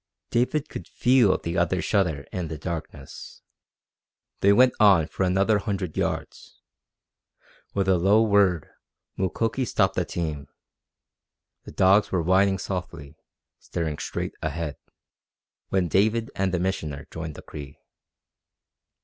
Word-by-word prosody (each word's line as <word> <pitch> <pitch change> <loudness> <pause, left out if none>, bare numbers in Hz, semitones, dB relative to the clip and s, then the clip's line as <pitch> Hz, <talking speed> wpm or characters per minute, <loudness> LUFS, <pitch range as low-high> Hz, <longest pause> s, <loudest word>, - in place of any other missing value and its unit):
David 140 +5 +1
could - - -8
feel 120 -6 +3
the 85 +1 -3
other's 90 +2 0
shudder 85 -9 0
in 90 -3 -3
the 80 -1 -6
darkness. 75 -4 -8 1.0
They 100 - +4
went 125 +5 +5
on 100 -7 +6
for 80 - -7
another 95 +3 +2
hundred 100 -5 -3
yards. - - -4 1.2
With 100 -1 0
a 95 -2 +3
low 100 +5 +4
word 100 -7 +3 0.5
Mukoki 115 +7 -1
stopped 95 -5 +1
the 90 - 0
team. 80 -5 -4 1.2
The - - -9
dogs 95 +3 +3
were 90 -3 0
whining 95 +3 +3
softly, 85 -6 -6 0.4
staring 80 -4 -4
straight - - -4
ahead, 80 -1 -3 0.9
when 95 -2 +1
David 110 +6 +1
and 95 -1 0
the 90 - 0
Missioner 80 -6 -3
joined 80 -2 -6
the - - -11
Cree. 70 -2 -10
95 Hz, 125 wpm, -25 LUFS, 80-100 Hz, 1.2 s, on